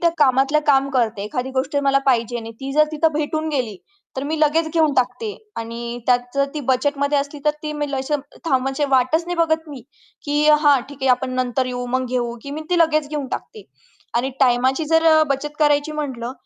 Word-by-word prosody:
त्या 340 - +3
कामातलं 275 +1 +3
काम 275 -1 +4
करते. 230 -6 0
एखादी 250 +4 -3
गोष्ट 265 +2 -2
मला 275 0 +3
पाहिजे 240 -2 +2
आणि 225 -1 -7
ती 270 0 -4
जर 305 +1 +5
तिथं 315 +1 +1
भेटून 310 +1 -2
गेली, 250 -9 -2 0.4
तर 265 - -2
मी 310 +2 -2
लगेच 315 +2 +3
घेऊन 315 -3 +3
टाकते 250 -3 0 0.3
आणि 235 +1 -5
त्यात 250 -1 +5 0.2
जर 275 0 +3
ती 300 - -3
बजेटमध्ये 280 +2 +1
असली 285 +1 -4
तर 300 - +4
ती 300 0 -3
मी 295 -1 -3
लशे 270 +2 -1
अं, 295 - 0 0.2
थांब 265 -5 +2
म्हणजे 270 +2 -1
वाटच 265 +6 +2
नाही 355 - -3
बघत 320 -1 +1
मी 280 -3 -8 0.4
की 295 +1 +1
हां 290 -3 +5
ठीक 285 -1 -11
आहे 265 - +1
आपण 255 +1 +1
नंतर 255 0 0
येऊ, 245 -1 -4
मग 255 +1 -1
घेऊ 240 -1 -2
की 280 - -8
मी 305 +2 -5
ती 355 - +3
लगेच 310 -3 +2
घेऊन 295 -3 -3
टाकते. 430 - -6 0.5
आणि 245 +3 0
टाईमाची 260 +4 +3
जर 325 0 +4
अ, 315 -1 +6
बचत 295 +2 -2
करायची 295 0 +2
म्हटलं, 260 -5 -4
275 Hz, 210 wpm, -21 LUFS, 255-300 Hz, 0.5 s, अ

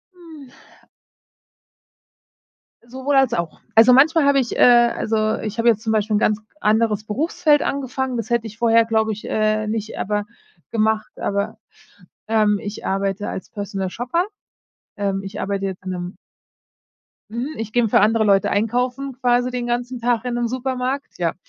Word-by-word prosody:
Hm. 320 -6 -13 2.4
Sowohl 265 +3 -2
als 265 -3 +4
auch. 170 -7 -3 0.2
Also, 225 +3 +7
manchmal 305 +3 +5
habe 280 -1 +4
ich, 240 - -2
äh - - -4
also, 240 -2 +4
äh, 215 0 0
ich 215 +2 -5
habe 230 +1 +1
jetzt 220 -2 +4
zum 220 - -2
Beispiel 215 0 +1
'n - - +3
ganz 215 0 +1 0.2
anderes 215 0 +2
Berufsfeld 300 +6 +1
angefangen. 265 -2 -2
Das 230 -1 -4
hätte 235 -1 0
ich 215 0 -12
vorher, 230 -1 +4
glaube 220 -1 +1
ich, 210 0 -7
äh, 215 0 +1
nicht 220 0 -4
aber 205 0 -1 0.5
gemacht, 220 -1 0
aber 200 +2 -2 0.7
ähm, 210 -2 +2
ich 205 +1 -7
arbeite 195 +1 -1
als 190 - -7
Personal 200 -2 -4
Shopper. 250 - -1 0.7
Ähm, 195 -1 -1
ich 195 - -6
arbeite 195 0 -2
jetzt 190 -1 -5
in 185 - -3
'nem 180 0 -5 1.2
mhm, 250 +6 -4
ich 220 -1 -5
geh 245 - +3
'n 225 - +1
für - - +4
andere 220 +1 +3
Leute 195 -2 +3
einkaufen 250 +5 -1
quasi 245 0 +2
den 245 -1 -3
ganzen 245 +1 -2
Tag 235 0 0
in 250 - -2
'nem 240 0 0
Supermarkt, 260 +2 -3
ja. 170 -2 0
225 Hz, 170 wpm, -21 LUFS, 210-250 Hz, 2.4 s, Also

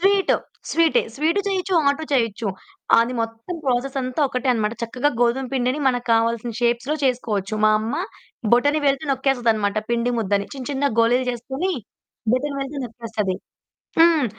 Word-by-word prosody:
Sweet, 390 +1 +3 0.3
స్వీటే. 330 -1 +3
Sweet 320 +8 +1
చేయొచ్చు, 380 -1 -1
hot 280 +3 +1
చేయొచ్చు. 230 -4 +1 0.5
అది 230 +2 +2
మొత్తం 225 +8 -4
ప్రాసెసంతా 255 +1 -1
ఒకటే 255 +1 -2
అన్నమాట. 220 -1 0
చక్కగా 250 +5 0
గోధుమ 245 +2 +2
పిండిని 255 +2 0
మనకు 245 -1 -1
కావాల్సిన 230 +1 +1
షేప్స్‌లో 240 +4 +1
చేసుకోవచ్చు. 220 -6 0
మాయమ్మ 215 +3 +2 0.6
బొటనివేలితో 285 +3 +3
నొక్కేస్తదన్నమాట 235 -6 +1
పిండి 235 +1 +1
ముద్దని. 200 -2 0
చిన్న 260 -2 -7
చిన్న 275 +1 -1 0.2
గోలీలు 245 +3 +3
చేసుకొని, 265 +10 -3 0.6
బొటనివేలితో 275 +1 -2
నొక్కేస్తది. 220 -5 -3 0.6
హ్మ్. 325 -4 +6
250 Hz, 125 wpm, -22 LUFS, 230-280 Hz, 0.6 s, హ్మ్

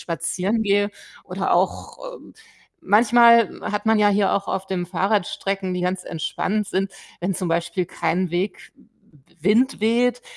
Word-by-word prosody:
spazieren 180 +6 -2
gehe 205 0 +1 0.3
oder - - -2
auch, - - -1 0.2
äh - - -11 0.6
manchmal 235 +2 +4
hat 210 +1 -3
man 220 -1 +4
ja 210 -1 +4
hier 200 -1 +2
auch 200 -1 -1
auf 190 0 -3
dem 180 -2 -3
Fahrrad 195 +2 0
Strecken, 195 -2 -3
die 180 - -3
ganz 180 +1 -2
entspannt 195 +5 -2
sind, 195 +1 -2 0.3
wenn 180 +2 -1
zum 180 - -3
Beispiel 170 +2 -1
kein 180 0 -1
Weg 180 +3 -3
W - - -24 0.5
Wind 220 - +2
weht 240 +2 +1
195 Hz, 155 wpm, -22 LUFS, 180-215 Hz, 0.6 s, manchmal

